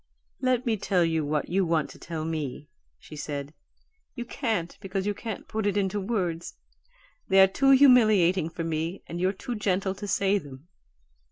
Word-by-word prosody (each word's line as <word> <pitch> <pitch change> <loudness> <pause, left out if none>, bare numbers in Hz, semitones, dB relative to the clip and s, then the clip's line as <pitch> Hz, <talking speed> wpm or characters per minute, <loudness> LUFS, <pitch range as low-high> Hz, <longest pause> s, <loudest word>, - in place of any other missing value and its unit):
"Let 255 -1 +1
me 225 -3 +1
tell 180 -3 +1
you 160 -1 0
what 150 0 -1
you 190 +2 +2
want 165 -3 0
to - - -14
tell 160 -2 -5
me," 150 -3 -4 0.3
she 155 - -12
said. 145 -1 -5 0.6
"You 240 -2 -5
can't, 220 - -2
because 195 -1 -3
you 205 - 0
can't 220 +1 -7
put 220 -1 -2
it 205 0 0
into 200 0 0
words 180 -6 -2 0.7
they 195 - +4
are 190 - +10
too 270 +8 +1
humiliating 215 - +5
for 165 0 -5
me 165 +3 -3
and 170 +1 -6
you're 185 +1 +2
too 210 +5 -6
gentle 195 -3 0
to 205 +1 -7
say 200 0 +2
them. 140 -1 -13
190 Hz, 180 wpm, -27 LUFS, 165-210 Hz, 0.7 s, are